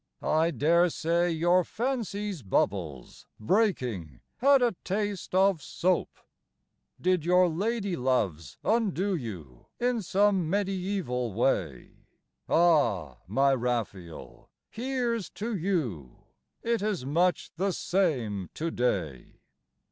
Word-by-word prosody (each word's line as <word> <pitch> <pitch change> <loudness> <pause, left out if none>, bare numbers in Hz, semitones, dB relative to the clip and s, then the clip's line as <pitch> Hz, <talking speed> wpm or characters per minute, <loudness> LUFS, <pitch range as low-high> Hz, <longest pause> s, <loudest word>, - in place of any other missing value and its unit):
I 160 +2 +2
dare 170 +2 +3
say 170 +2 +1
your 175 +2 +3
fancy's 210 - -3
bubbles, 95 - -2
Breaking, 115 - 0 0.2
had 275 0 +5
a 235 -5 +2
taste 200 -1 -3
of 190 -3 +4
soap. 180 +5 0 0.9
Did 180 -3 +1
your 180 +2 +4
lady 200 +3 -1
loves 100 - -1
undo 205 -4 +1
you 90 - -8
In 245 -1 +1
some 195 -2 +2
mediæval 185 - -1
way? 90 - -1 0.5
Ah, 120 - +2
my 135 +7 +3
Raphael, 115 -9 -4 0.2
here's 240 -4 -2
to 225 +2 -2
you! 145 - -3 0.4
It 230 -2 0
is 205 -10 -2
much 170 +4 +1
the 195 +3 +1
same 125 - -1
to 165 +1 -2
day. 90 - -2
170 Hz, 105 wpm, -28 LUFS, -, 0.9 s, had